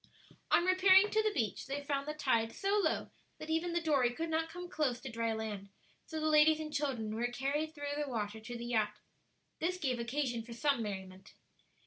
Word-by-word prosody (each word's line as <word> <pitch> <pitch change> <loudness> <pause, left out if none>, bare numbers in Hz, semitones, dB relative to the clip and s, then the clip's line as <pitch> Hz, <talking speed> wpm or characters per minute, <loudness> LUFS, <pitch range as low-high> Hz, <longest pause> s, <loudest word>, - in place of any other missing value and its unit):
On 345 - +4
repairing 375 +2 +6
to 435 - +3
the 430 0 +1
beach, 240 - -2
they 280 +1 -3
found 280 0 -2
the 300 - -3
tide 230 -6 +1
so 395 +1 0
low - - 0 0.3
that 310 - -6
even 330 +2 0
the 345 - +1
dory 285 -7 +3
could 325 +7 -4
not 320 0 0
come 355 +2 -7
close 295 -9 0
to 265 0 -7
dry 230 0 -1
land; 215 -3 -4 0.4
so 315 - -4
the 310 - -2
ladies 310 0 +5
and 305 -1 -5
children 260 -7 -1
were 235 +2 0
carried 285 +6 -2
through 290 -1 -3
the 290 - -5
water 220 -3 -3
to 240 +2 -7
the 235 - -6
yacht. 215 -3 0 0.6
This 360 +3 0
gave 260 -8 -1
occasion 240 0 -1
for 235 +1 -9
some 275 +1 +1
merriment. 190 -3 -7
280 Hz, 205 wpm, -34 LUFS, 230-315 Hz, 0.6 s, repairing